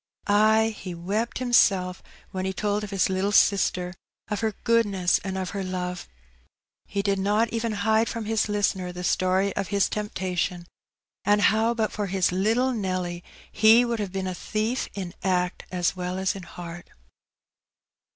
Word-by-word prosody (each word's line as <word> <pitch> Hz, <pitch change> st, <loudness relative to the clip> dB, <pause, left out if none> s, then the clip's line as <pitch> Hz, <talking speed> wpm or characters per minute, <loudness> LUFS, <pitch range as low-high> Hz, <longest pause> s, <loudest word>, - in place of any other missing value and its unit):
Ay, 220 Hz, +2 st, +4 dB
he 180 Hz, -3 st, -7 dB
wept 205 Hz, +7 st, -2 dB
himself 195 Hz, -7 st, +3 dB, 0.3 s
when 185 Hz, -1 st, -3 dB
he 190 Hz, -, -1 dB
told 210 Hz, +1 st, -1 dB
of 210 Hz, -, -5 dB
his 195 Hz, -2 st, +1 dB
little 190 Hz, +2 st, 0 dB
sister, 185 Hz, -3 st, +3 dB, 0.4 s
of 210 Hz, -, -1 dB
her 220 Hz, -2 st, -1 dB
goodness 205 Hz, -6 st, +2 dB
and 190 Hz, -1 st, -3 dB
of 185 Hz, -1 st, -3 dB
her 200 Hz, -1 st, -3 dB
love. 180 Hz, -1 st, -4 dB, 0.8 s
He 200 Hz, 0 st, -2 dB
did 200 Hz, -1 st, +1 dB
not 210 Hz, +4 st, +2 dB
even 230 Hz, -1 st, -1 dB
hide 220 Hz, +1 st, +3 dB
from 230 Hz, -2 st, -4 dB
his 220 Hz, 0 st, 0 dB
listener 195 Hz, -3 st, 0 dB
the 180 Hz, 0 st, -7 dB
story 185 Hz, +2 st, +1 dB
of 195 Hz, -, -2 dB
his 200 Hz, +2 st, +1 dB
temptation, 185 Hz, -4 st, -2 dB, 0.6 s
and 205 Hz, +1 st, +3 dB
how 220 Hz, +3 st, +3 dB
but 220 Hz, -2 st, 0 dB
for 205 Hz, -1 st, -3 dB
his 185 Hz, -1 st, +1 dB
little 225 Hz, +8 st, +1 dB
Nelly 185 Hz, -5 st, -3 dB, 0.3 s
he 225 Hz, +3 st, +6 dB
would 235 Hz, -1 st, -2 dB
have 200 Hz, -3 st, -3 dB
been 190 Hz, 0 st, -3 dB
a 185 Hz, -, -2 dB
thief 220 Hz, +7 st, -2 dB
in 185 Hz, -3 st, -5 dB
act 180 Hz, -1 st, 0 dB
as 180 Hz, 0 st, 0 dB
well 180 Hz, 0 st, -3 dB
as 190 Hz, 0 st, 0 dB
in 195 Hz, -, -7 dB
heart. 170 Hz, 0 st, -9 dB
195 Hz, 170 wpm, -25 LUFS, 185-215 Hz, 0.8 s, he